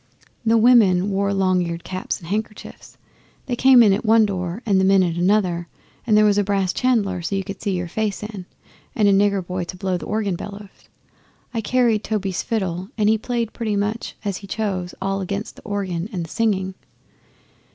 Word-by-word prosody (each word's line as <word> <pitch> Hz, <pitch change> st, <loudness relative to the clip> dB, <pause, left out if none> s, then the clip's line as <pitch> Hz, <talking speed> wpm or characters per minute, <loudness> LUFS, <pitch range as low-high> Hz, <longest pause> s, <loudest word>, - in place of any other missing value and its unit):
The 230 Hz, 0 st, +3 dB
women 210 Hz, -5 st, +5 dB
wore 200 Hz, +1 st, 0 dB
long 185 Hz, -2 st, +2 dB
eared 170 Hz, -1 st, -4 dB
caps 185 Hz, 0 st, -4 dB
and 165 Hz, -, -13 dB
handkerchiefs. 210 Hz, +2 st, -6 dB, 0.5 s
They 245 Hz, -, -2 dB
came 260 Hz, -1 st, +7 dB
in 205 Hz, -3 st, +5 dB
at 200 Hz, -, -1 dB
one 220 Hz, 0 st, +5 dB
door 185 Hz, +2 st, -4 dB
and 200 Hz, -4 st, +3 dB
the -, -, +2 dB
men 190 Hz, 0 st, +5 dB
at 170 Hz, -2 st, -1 dB
another, 175 Hz, -2 st, +1 dB, 0.4 s
and 215 Hz, -2 st, +4 dB
there 215 Hz, -, +6 dB
was 205 Hz, -1 st, +3 dB
a -, -, +2 dB
brass 195 Hz, -2 st, 0 dB
chandelier 210 Hz, -8 st, +1 dB
you 195 Hz, -1 st, -1 dB
could 195 Hz, 0 st, -8 dB
see 200 Hz, -4 st, -1 dB
your 175 Hz, 0 st, -3 dB
face 210 Hz, +3 st, -2 dB
in, 205 Hz, -4 st, -7 dB, 0.5 s
and 210 Hz, -2 st, +3 dB
a 200 Hz, -, +5 dB
nigger 200 Hz, -1 st, +2 dB
boy 180 Hz, 0 st, -3 dB
to 180 Hz, -, -8 dB
blow 185 Hz, 0 st, -1 dB
the 165 Hz, -, -8 dB
organ 210 Hz, -3 st, -1 dB
bellows. 200 Hz, +2 st, -10 dB, 0.6 s
I 230 Hz, -, -1 dB
carried 230 Hz, -1 st, +2 dB
Toby's 195 Hz, -4 st, -2 dB
fiddle, 190 Hz, -4 st, -3 dB
and 210 Hz, -1 st, +3 dB
he 220 Hz, 0 st, +3 dB
played 235 Hz, -1 st, -2 dB
pretty 220 Hz, -3 st, -2 dB
much 210 Hz, +3 st, -2 dB
as 200 Hz, -3 st, -1 dB
he 200 Hz, -, -11 dB
chose 190 Hz, -4 st, -3 dB
all 195 Hz, 0 st, -1 dB
against 200 Hz, +3 st, -4 dB
the -, -, -13 dB
organ 195 Hz, -3 st, -3 dB
and 175 Hz, -5 st, -3 dB
the -, -, -13 dB
singing. 195 Hz, -5 st, 0 dB
200 Hz, 200 wpm, -21 LUFS, 185-215 Hz, 0.6 s, came